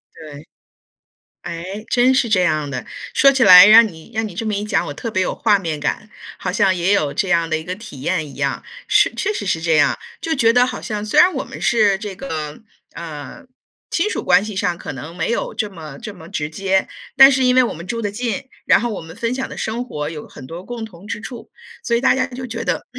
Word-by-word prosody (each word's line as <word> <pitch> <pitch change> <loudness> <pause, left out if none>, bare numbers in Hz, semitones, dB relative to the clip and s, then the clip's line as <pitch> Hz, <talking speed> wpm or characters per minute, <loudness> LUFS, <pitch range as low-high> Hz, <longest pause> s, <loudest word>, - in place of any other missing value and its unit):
对， 150 -1 -11 1.0
诶， 185 +6 -6
真 255 +1 +4
是 255 -2 +2
这 200 -4 +3
样 155 -4 0
的， 125 -3 -5 0.3
说 275 +1 +6
起 265 -2 +2
来 185 +1 +10
让 225 +1 +8
你 165 +4 -13
让 220 0 -1
你 190 - -10
这 210 - -4
么 215 - -1
一 205 - -2
讲， 210 -1 0
我 145 - -5
特 230 +8 -6
别 185 - 0
有 - - -1
画 205 -3 +3
面 160 -5 -4
感。 210 +8 -3 0.3
好 180 - -3
像 195 -2 +2
也 175 +2 0
有 150 -7 +1
这 195 - -1
样 170 -2 +2
的 160 - +1
一 160 - -7
个 180 +2 -5
体 185 - -11
验 160 -1 -1
一 140 - -12
样， 140 -1 -2 0.2
是 - - +3
确 420 - -1
实 305 - -4
是 165 -3 -1
这 165 -1 +2
样， 150 - +3 0.2
就 325 - -2
觉 230 -5 +3
得 245 +1 +4
好 250 -1 -5
像 210 -1 -4
虽 210 - +2
然 360 +1 +6
我 - - -3
们 - - -10
是 215 -5 +3
这 205 -3 -6
个， 155 - -6 0.4
呃， 165 - -8 0.5
亲 380 +5 0
属 - - -3
关 195 - +4
系 215 -2 -6
上 180 -2 0
可 - - -7
能 155 +6 -9
没 165 +2 -2
有 235 - -2
这 210 - -2
么， 155 -7 -10
这 210 - -7
么 165 -3 -13
直 150 -2 -4
接， 190 +2 0 0.3
但 270 +1 +9
是 260 -1 +1
因 250 - +4
为 255 - +6
我 - - -2
们 170 +3 -9
住 230 +4 -4
得 205 - -2
近， 235 +2 -3 0.2
然 - - +4
后 240 - -1
我 205 - -5
们 165 +1 -11
分 235 +1 -2
享 265 - -3
的 - - -9
生 235 +3 -3
活 150 -9 -5
有 155 -2 -8
很 130 - -12
多 170 +5 -8
共 240 -2 -6
同 195 -3 -11
之 210 - -5
处， 240 0 -9 0.3
所 235 - 0
以 235 - 0
大 270 - +4
家 260 - +1
就 255 -1 -8
觉 230 -1 -5
得 - - -2
200 Hz, 270 characters per minute, -19 LUFS, 165-235 Hz, 1.0 s, 来